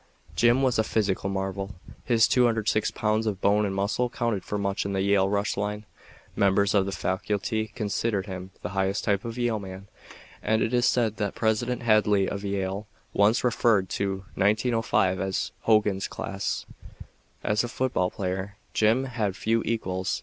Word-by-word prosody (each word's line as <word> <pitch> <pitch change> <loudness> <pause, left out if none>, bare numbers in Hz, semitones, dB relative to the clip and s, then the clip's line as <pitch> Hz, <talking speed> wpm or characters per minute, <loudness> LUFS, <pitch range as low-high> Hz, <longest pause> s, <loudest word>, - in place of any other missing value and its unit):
Jim 120 +3 +4
was 125 -4 +2
a - - +4
physical 100 -3 0
marvel. 95 0 -3 0.3
His 115 -2 +4
206 115 -3 +2
pounds 110 0 0
of 100 -3 -1
bone 105 +2 +3
and 95 - -3
muscle 105 +5 0
counted 115 -5 -1
for 105 - -3
much 100 0 -1
in 100 - -3
the 95 - 0
Yale 100 -1 +3
rush 100 0 0
line. 105 +1 -3 0.5
Members 100 0 +3
of 100 -2 +3
the - - -2
faculty 105 +4 -1
considered 105 -2 -2
him 95 -2 -7
the 90 - -3
highest 95 +1 -1
type 100 -2 +1
of 115 +1 -5
Yale 120 -3 0
man, 95 0 -9 0.5
and 110 +1 +1
it 115 - -1
is 120 -1 +3
said 115 -3 +1
that 105 -3 -2
President 120 +3 0
Hadley 105 -3 +3
of 100 - -4
Yale 100 +1 -2 0.3
once 105 +4 +3
referred 115 -6 +2
to 95 -1 -2
1905 105 -2 +2
as 95 0 -2 0.2
"Hogan's 105 -3 +3
Class." 100 0 -4 0.8
As 105 +1 +1
a - - -2
football 120 -7 0
player, 95 +2 -4 0.2
Jim 110 +4 +3
had 110 -7 -2
few 115 +2 +1
equals. 95 -4 -1
105 Hz, 165 wpm, -26 LUFS, 95-115 Hz, 0.8 s, Jim